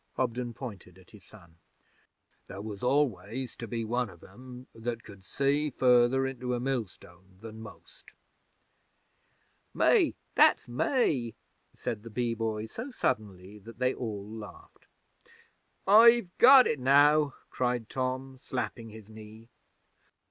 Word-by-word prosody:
Hobden 120 -2 -2
pointed 100 -8 -9
at 95 - -20
his 105 -3 -16
son. 85 -6 -18 0.9
'There 95 +2 -8
was 105 -2 -7
always 130 -2 -1
to 115 - -7
be 115 0 -4
one 120 +1 -1
of 85 -3 -16
'em 125 0 -12
that 115 0 -5
could 100 -2 -14
see 140 +7 0
further 125 0 +3
into 125 -1 -3
a - - -3
millstone 95 -7 -6
than 110 0 -10
most.' 85 -7 -14 1.7
'Me! - - +3 0.2
That's - - +4
me!' 125 - 0 0.4
said 105 - -5
the 115 - -10
Bee 115 +2 -2
Boy 110 -1 -3
so 225 - -7
suddenly 105 - -3
that 115 +3 -13
they 130 +1 +1
all 105 -4 -6
laughed. 110 -1 -12 1.0
'I've 225 -1 +6
got 260 +1 +9
it 150 - -1
now!' 145 +2 +4 0.2
cried 125 -3 -2
Tom, 130 +1 -4
slapping 125 -3 -5
his 110 -1 -13
knee. 110 +1 -13
120 Hz, 130 wpm, -29 LUFS, 105-130 Hz, 1.7 s, got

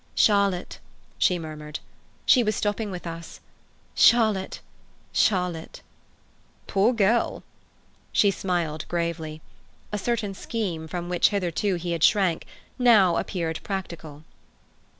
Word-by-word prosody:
"Charlotte," 200 -4 +2 0.4
she 180 - +3
murmured. 155 -2 -7 0.5
"She 255 - +6
was 215 -3 0
stopping 210 +1 -1
with 180 -2 -7
us. 165 0 -7 0.5
Charlotte—Charlotte." 190 -4 +1 0.8
"Poor 200 +5 +3
girl!" 230 0 +1 0.7
She 200 - +4
smiled 175 -5 -2
gravely. 165 -2 -3 0.5
A 210 - -2
certain 220 -2 -1
scheme, 190 -7 -4
from 175 +2 -5
which 175 -1 +3
hitherto 195 -1 0
he 175 0 -4
had 165 -2 -1
shrunk, 190 -6 +3 0.3
now 210 -8 +5
appeared 165 -4 -2
practical. 170 -6 -6
180 Hz, 105 wpm, -25 LUFS, 165-205 Hz, 0.8 s, She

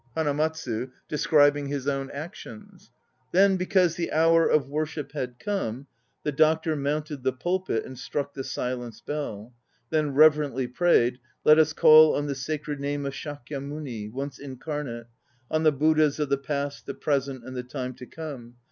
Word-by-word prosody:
HANAMATSU 150 -5 -1 0.2
(describing 145 -1 +3
his 140 -1 -3
own 135 -1 -1
actions). 190 +6 -10 0.4
Then 195 +2 +5
because 185 -2 +2
the 170 - -2
hour 165 +1 +4
of 145 -3 +2
worship 150 +1 -3
had 125 -4 -4
come 140 - -3 0.4
The 150 - 0
Doctor 160 +2 +2
mounted 150 0 -2
the 130 +1 +1
pulpit 175 -2 -2
and 130 -1 -10
struck 140 +1 -3
the 135 - -5
silence 125 -3 -4
bell; 125 -6 -5 0.4
Then 150 -3 0
reverently 145 -3 +4
prayed: 125 -3 +2 0.2
Let 155 +1 +7
us 155 -1 +4
call 155 0 +7
on 145 - -1
the 145 - -2
Sacred 145 +1 -4
Name 140 0 -2
of 140 - -3
Shakyamuni, 140 -5 -6
once 135 +2 -5
incarnate; 135 -3 -5 0.5
On 155 - +1
the 155 -1 +5
Buddhas 155 +1 +3
of 150 -2 -1
the 140 - +2
Past, 140 0 -4
the - - -4
Present 135 -3 -1
and 130 0 -8
the 125 - -2
Time 125 0 -5
to 125 - -11
Come. 135 -7 -8
145 Hz, 160 wpm, -26 LUFS, 130-155 Hz, 0.5 s, Let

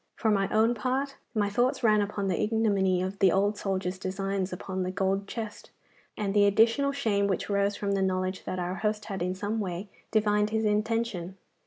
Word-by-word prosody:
For 220 - +1
my 195 -1 +2
own 220 +2 +3
part, 260 +4 -2 0.2
my 205 -2 +2
thoughts 250 +4 +1
ran 215 -2 +5
upon 200 -1 -2
the 185 - 0
ignominy 200 -4 +2
of 190 +2 -4
the 190 -2 +5
old 200 +3 +2
soldier's 190 -2 -2
designs 195 0 -2
upon 185 +1 -4
the 185 - -1
gold 195 +1 -1
chest, 220 -1 -6 0.5
and 200 -2 -1
the 205 -1 +5
additional 230 +7 +3
shame 215 -8 +1
which 195 +1 -2
rose 200 0 +1
from 200 0 -2
the 195 -1 +1
knowledge 185 0 -1
that 185 - -3
our 180 0 -2
host 210 -1 -1
had 195 -4 -5
in 180 +1 -1
some 205 +3 -2
way 190 0 -4 0.2
divined 210 -1 +2
his 220 0 0
intention. 210 -3 -1
200 Hz, 195 wpm, -28 LUFS, 190-220 Hz, 0.5 s, ran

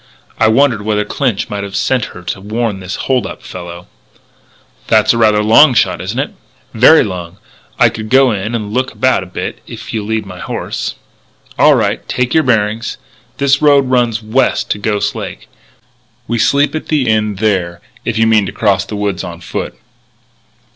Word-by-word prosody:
I - - +4
wondered 115 -1 +3
whether 105 0 -1
Clinch 125 -8 -1
might 100 -1 -4
have 100 -1 -7
sent 125 -4 +1
her 90 - -11
to 95 - -5
warn 110 0 -2
this 95 0 -5
hold 130 -6 +1
up - - -9
fellow." 85 0 -9 1.0
"That's 110 +1 +4
rather 110 -2 +3
a - - -2
long 125 +5 +6
shot, - - +1
isn't 95 +6 -4
it?" 135 - -2 0.4
"Very 130 +8 +6
long. 90 -2 -6 0.4
I - - +5
could 110 -1 -7
go 130 0 +5
in 105 +3 -3
and 105 -2 -4
look 130 +2 0
about 130 -4 +2
a 95 - -8
bit, 90 - -5
if - - -9
you'll 105 -2 -3
lead 110 -1 -1
my 90 -2 -10
horse." - - -4 0.6
"All - - +6
right. - - 0
Take 125 0 -1
your 160 - +5
bearings. 110 -4 0 0.4
This 140 0 +2
road 140 -3 +4
runs 120 -3 +1
west 115 +5 0
to 105 - -1
Ghost 105 0 -1
Lake. - - -7 0.8
We 120 0 -1
sleep 140 +5 +2
at 155 - -4
the 150 -4 0
Inn 105 -2 +1
there 95 -4 -1 0.2
if 115 -1 -2
you 115 - +3
mean 110 -3 +3
to - - -4
cross 95 -3 +1
the 105 - -6
woods 100 -3 -2
on 85 -1 -7
foot." 85 - -5
110 Hz, 185 wpm, -15 LUFS, 100-125 Hz, 1.0 s, long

